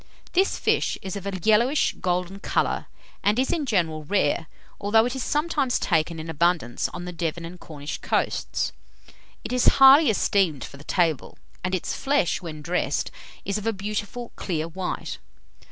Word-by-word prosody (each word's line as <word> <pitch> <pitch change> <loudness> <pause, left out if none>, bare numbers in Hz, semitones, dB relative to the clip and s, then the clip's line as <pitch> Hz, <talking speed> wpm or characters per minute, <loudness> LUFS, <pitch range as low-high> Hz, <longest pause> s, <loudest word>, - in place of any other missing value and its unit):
This 380 +2 +2
fish - - +1
is 190 0 -4
of 200 0 -5
a 195 -1 -2
yellowish 235 +7 +3
golden 180 +2 -1
colour, - - 0 0.4
and 205 +2 +3
is, 260 +1 +1
in 305 -5 -1
general, 165 -8 0
rare, 160 -1 +1 0.3
although 220 +3 +4
it 250 +2 -2
is 265 - -2
sometimes 295 -4 +1
taken 165 -1 0
in 160 - -6
abundance 165 -5 +1
on 175 0 -7
the 180 - -5
Devon 170 -1 -3
and 175 +2 -9
Cornish 150 -3 -7
coasts. - - -1 0.7
It - - -4
is 250 - +2
highly 275 +2 +8
esteemed 190 - +2
for 140 - -9
the 140 - -13
table, 165 -5 0 0.3
and 185 +1 0
its 180 - -3
flesh, 275 - +1
when 155 -4 -7
dressed, 165 -4 -1 0.3
is 200 +2 -1
of 210 - -5
a 225 - +2
beautiful 210 +4 -4
clear 165 -4 -2
white. 180 +2 -4
185 Hz, 170 wpm, -25 LUFS, 165-225 Hz, 0.7 s, highly